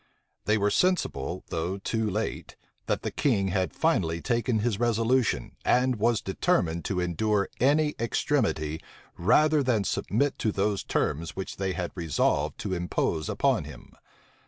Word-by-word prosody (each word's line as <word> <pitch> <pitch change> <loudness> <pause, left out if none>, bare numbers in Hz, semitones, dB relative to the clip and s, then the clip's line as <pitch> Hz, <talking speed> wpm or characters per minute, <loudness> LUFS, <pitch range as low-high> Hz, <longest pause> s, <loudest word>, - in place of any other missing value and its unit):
They 105 +1 +3
were 105 0 +1
sensible, 180 - 0
though 85 +4 -2
too 110 +2 -1
late, 105 +3 -3 0.3
that - - -1
the - - -2
king 100 -9 +1
had 95 -2 0
finally 80 -1 +1
taken 115 +3 0
his 110 -3 0
resolution, 115 - +1
and 125 -1 +2
was 115 0 +2
determined 85 -3 0
to 95 - -1
endure 100 +4 0
any 150 +4 +3
extremity 80 -8 0 0.3
rather 150 - +4
than 120 -6 +1
submit 130 +8 0
to 110 - +1
those 100 -1 0
terms 80 +2 -1
which 95 - -5
they 95 -1 -1
had 90 -1 -3
resolved 75 -3 0
to 100 -3 -3
impose 85 -3 -1
upon - - +1
him. - - -12
100 Hz, 145 wpm, -27 LUFS, 90-120 Hz, 0.3 s, rather